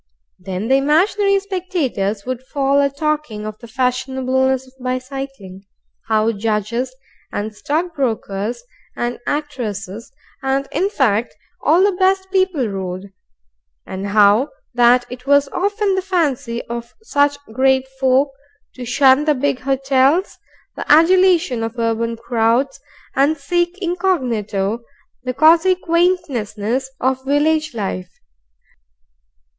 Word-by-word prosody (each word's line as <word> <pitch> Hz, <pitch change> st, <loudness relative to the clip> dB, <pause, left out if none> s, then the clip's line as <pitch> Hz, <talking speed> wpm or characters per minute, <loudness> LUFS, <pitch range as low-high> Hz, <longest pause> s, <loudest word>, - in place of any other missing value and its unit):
Then 185 Hz, +3 st, -4 dB
the 265 Hz, +2 st, +4 dB
imaginary 390 Hz, +8 st, +3 dB
spectators 340 Hz, -, -2 dB
would 255 Hz, -1 st, -3 dB
fall 275 Hz, +1 st, +1 dB
a 280 Hz, -, +2 dB
talking 280 Hz, -7 st, -2 dB
of 215 Hz, 0 st, -7 dB
the 235 Hz, -, -11 dB
fashionableness 260 Hz, +2 st, 0 dB
of 260 Hz, -, -20 dB
bicycling, 255 Hz, -6 st, -5 dB, 0.4 s
how 220 Hz, 0 st, +2 dB
judges 225 Hz, +4 st, -2 dB, 0.4 s
And 215 Hz, +1 st, -4 dB
stockbrokers 250 Hz, -, -2 dB, 0.3 s
and 240 Hz, 0 st, -3 dB
actresses 230 Hz, -8 st, -4 dB, 0.3 s
and, 270 Hz, +1 st, 0 dB
in 390 Hz, -, 0 dB
fact, 225 Hz, -, +1 dB, 0.3 s
all 335 Hz, +5 st, +4 dB
the 405 Hz, -, +4 dB
best 380 Hz, 0 st, +1 dB
people 375 Hz, -, +1 dB
rode, 190 Hz, -1 st, -5 dB, 0.7 s
and 190 Hz, +1 st, -5 dB
how 210 Hz, +6 st, +4 dB, 0.2 s
that 245 Hz, 0 st, +4 dB
it 250 Hz, +1 st, -9 dB
was 285 Hz, 0 st, +4 dB
often 405 Hz, +4 st, 0 dB
the 380 Hz, -, 0 dB
fancy 290 Hz, -11 st, -1 dB
of 235 Hz, 0 st, -7 dB
such 285 Hz, -7 st, +2 dB, 0.2 s
great 265 Hz, +1 st, +2 dB
folk 265 Hz, +1 st, +3 dB, 0.4 s
to 250 Hz, -, -8 dB
shun 265 Hz, +3 st, +4 dB
the 300 Hz, -1 st, +3 dB
big 265 Hz, -1 st, 0 dB
hotels, 270 Hz, +5 st, +1 dB, 0.4 s
the -, -, -3 dB
adulation 340 Hz, -4 st, +5 dB
of 225 Hz, +2 st, -4 dB
urban 230 Hz, 0 st, -1 dB
crowds, 235 Hz, +5 st, 0 dB, 0.4 s
and 285 Hz, +4 st, +3 dB
seek, 345 Hz, +5 st, -1 dB
incognito, 245 Hz, -, -1 dB, 0.4 s
the 255 Hz, 0 st, -4 dB
cosy 330 Hz, +5 st, +5 dB
quaintnesses 265 Hz, -, 0 dB
of 260 Hz, +1 st, 0 dB
village 300 Hz, +1 st, +1 dB
life. 185 Hz, -4 st, -4 dB
265 Hz, 120 wpm, -19 LUFS, 230-310 Hz, 0.7 s, adulation